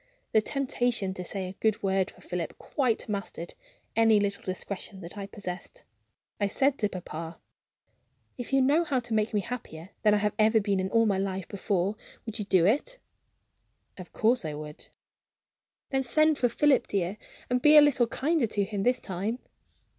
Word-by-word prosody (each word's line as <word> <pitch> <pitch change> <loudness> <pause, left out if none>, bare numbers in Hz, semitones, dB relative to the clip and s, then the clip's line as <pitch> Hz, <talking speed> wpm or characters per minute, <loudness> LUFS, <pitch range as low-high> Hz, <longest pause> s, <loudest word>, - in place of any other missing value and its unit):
The 220 - +4
temptation 245 -6 0
to 180 - -6
say 190 +1 -3
a 185 - -7
good 220 -2 +1
word 190 -1 +1
for - - -17
Philip 175 -2 -4
quite 255 -6 -1
mastered 200 -5 -5 0.4
any 225 -2 +5
little 200 0 -1
discretion 190 +1 -5
that 170 +3 -9
I 200 -1 -6
possessed. 200 - -8 0.6
I 205 - +2
said 270 +6 +1
to 210 - +1
papa: 165 -3 -7 1.0
"If 245 +1 -7
you 270 -1 +4
knew 295 +6 +4
how 290 -5 -1
to 240 -2 -3
make 215 0 +1
me 210 - +1
happier 190 -8 -7
than 210 -1 +4
I - - +3
have 210 0 0
ever 220 +1 +5
been 200 -2 0
in 185 0 -1
all 230 +2 +3
my 200 -3 +1
life 190 -1 -3
before, 200 0 -1 0.3
would 225 -2 -5
you 210 - -3
do 185 -4 +4
it?" 295 - +1 1.0
"Of 185 -2 -10
course 235 +1 +2
I 155 -2 -4
would." 150 0 -9 1.0
"Then 270 -1 +2
send 310 +3 +3
for 245 - +3
Philip, 290 +3 +3
dear, 195 +1 -2 0.3
and 250 0 0
be 300 +2 +7
a - - +11
little 255 -5 +3
kinder 290 +1 +1
to 205 -1 0
him, 200 0 -3
this 250 +4 +2
time." 200 +5 -3
210 Hz, 185 wpm, -28 LUFS, 190-245 Hz, 1.0 s, a